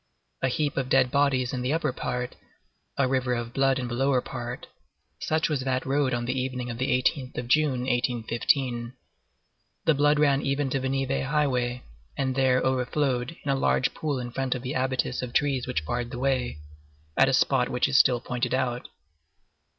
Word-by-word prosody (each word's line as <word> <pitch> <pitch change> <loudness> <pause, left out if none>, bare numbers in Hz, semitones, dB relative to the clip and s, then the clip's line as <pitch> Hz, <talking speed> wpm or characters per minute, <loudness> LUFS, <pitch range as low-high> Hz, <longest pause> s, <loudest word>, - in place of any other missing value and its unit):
A - - +2
heap 145 +3 -1
of 130 -1 -1
dead 130 -2 +4
bodies 140 -3 +2
in 125 - -2
the 125 +2 -1
upper 155 -5 0
part, 125 0 -3 0.6
a 140 - +3
river 130 -1 0
of 120 0 -5
blood 135 -1 +2
in 125 -2 -3
the 120 - -5
lower 135 +1 +2
part—such 125 +5 -5
was 150 -4 -1
that 130 0 -1
road 140 0 +1
on 120 -1 -1
the 125 - -1
evening 125 -1 -3
of 115 - -7
the 130 - 0
18th 130 +1 0
of 120 - -3
June, 140 -1 +2
1815. 120 0 0 0.9
The 160 - +5
blood 145 +1 +3
ran 140 -2 +3
even 140 0 -1
to 135 - +1
the 130 0 -2
Nivelles 135 0 -1
highway, 125 -5 0 0.3
and 130 -1 0
there 130 -1 +3
overflowed 130 +2 0
in 140 - +1
a - - +2
large 130 -1 +1
pool 150 -3 -2
in 120 -1 -5
front 130 +1 -1
of 125 - -6
the 130 - -3
abatis 130 -1 -1
of 125 -1 -6
trees 135 -4 +1
which 100 -12 -2
barred 120 +7 -2
the 120 - -6
way, 130 - 0 0.6
at 135 - +5
a - - +2
spot 130 -1 +3
which 125 +1 +1
is 140 - -2
still 125 -2 +5
pointed 125 +1 -2
out. 125 -2 -2
130 Hz, 190 wpm, -26 LUFS, 125-135 Hz, 0.9 s, The